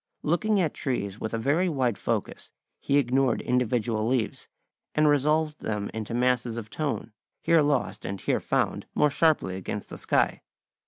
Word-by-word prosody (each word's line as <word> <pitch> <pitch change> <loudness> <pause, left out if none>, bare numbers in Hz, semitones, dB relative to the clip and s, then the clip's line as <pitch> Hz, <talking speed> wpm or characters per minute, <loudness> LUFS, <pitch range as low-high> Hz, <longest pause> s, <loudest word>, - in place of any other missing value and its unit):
Looking 200 +6 +2
at 165 -5 +1
trees 105 -6 -3
with 110 - -3
a 115 - -1
very 155 +10 +1
wide 130 -7 +1
focus, - - -3 0.3
he 140 - +1
ignored 130 -2 +2
individual 120 -3 0
leaves, 125 -3 -1 0.5
and 150 0 +4
resolved 150 +2 +2
them 105 -2 -3
into 110 +1 -4
masses 120 -1 +1
of 110 -2 -7
tone, 145 -6 -3 0.3
here 165 -1 +4
lost 145 -3 0
and 95 0 -4
here - - 0
found - - -1
more 150 -1 +3
sharply 150 - +2
against 95 - -5
the - - -8
sky. - - +1
125 Hz, 160 wpm, -27 LUFS, 110-150 Hz, 0.5 s, and